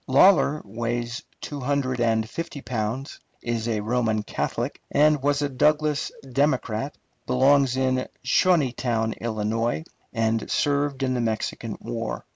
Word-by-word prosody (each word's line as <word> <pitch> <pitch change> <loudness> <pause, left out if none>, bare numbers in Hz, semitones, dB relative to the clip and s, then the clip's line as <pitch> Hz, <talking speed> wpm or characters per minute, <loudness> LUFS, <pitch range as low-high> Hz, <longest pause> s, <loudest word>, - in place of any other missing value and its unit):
Lawler 150 +1 +5
weighs 120 +3 -3 0.2
two 145 - -5
hundred 130 -1 0
and 110 -1 +2
fifty 165 +4 -5
pounds, 125 +2 -3 0.2
is 120 -1 -2
a 110 -2 0
Roman 110 -1 0
Catholic, - - -3
and 150 0 +4
was 145 +1 +1
a 145 - 0
Douglas 150 +2 +2 0.2
Democrat, 135 -2 0 0.3
belongs 130 0 +4
in 130 -1 +1 0.2
Shawneetown, 125 -9 +2
Ill., 115 +5 -1 0.3
and 115 -1 0
served 140 -1 +1
in 130 -1 +1
the 125 - 0
Mexican 110 0 -2
War. 115 -1 -4
125 Hz, 125 wpm, -25 LUFS, 115-140 Hz, 0.3 s, Lawler